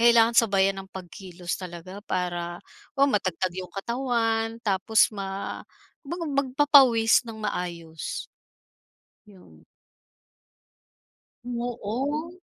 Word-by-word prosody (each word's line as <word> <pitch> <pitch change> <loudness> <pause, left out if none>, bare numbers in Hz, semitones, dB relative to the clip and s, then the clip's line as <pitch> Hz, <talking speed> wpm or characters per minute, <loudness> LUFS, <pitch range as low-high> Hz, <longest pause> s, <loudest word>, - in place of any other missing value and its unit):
Kailangan 235 0 +6
sabayan 195 -3 +4
ng - - -20
pagkilos 180 -1 -6
talaga 185 +1 -8
para 175 -1 -2 0.4
o 275 - +6
matatag 185 -3 0
'yong 185 -1 -6
katawan 230 0 -1
tapos 205 +2 +3
ma 195 0 -4 0.5
baga 340 +1 -3
magpapawis 270 -4 +5
ng 220 - -7
maayos. 170 -5 -4 1.0
Yun. 80 - -18 1.8
Oo. 245 +6 -3
205 Hz, 85 wpm, -26 LUFS, 185-235 Hz, 1.8 s, Kailangan